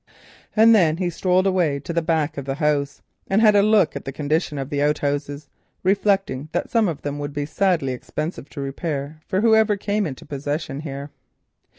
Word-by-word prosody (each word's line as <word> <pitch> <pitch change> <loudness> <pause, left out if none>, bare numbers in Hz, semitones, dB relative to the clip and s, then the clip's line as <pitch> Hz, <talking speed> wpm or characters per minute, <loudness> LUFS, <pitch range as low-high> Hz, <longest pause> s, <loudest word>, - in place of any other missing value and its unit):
And 225 +1 +7
then 165 -7 +4
he 180 -1 -1
strolled 185 +2 +1
away 175 -7 +1
to 170 - -5
the 170 - +1
back 160 -2 0
of 140 - -5
the 135 0 -2
house 145 -2 -1 0.2
and 195 - +2
had 215 -2 +5
a 200 - +6
look 210 -7 +3
at 140 - -5
the 135 - -5
condition 150 +2 -1
of 135 0 -5
the 145 -1 0
outhouses, 145 0 -1 0.4
reflecting 195 -7 +1
that 175 - -2
some 225 -3 +3
of 160 -5 -4
them 145 0 -3
would 145 0 -5
be 145 -1 -2
sadly 160 -5 +1
expensive 150 +4 -5
to 140 - -7
repair 140 +1 -4
for 190 - 0
whoever 220 -2 +4
came 205 0 -1
into 130 -4 -8
possession 145 0 -4
here. 140 -1 -6
155 Hz, 195 wpm, -22 LUFS, 145-190 Hz, 0.4 s, And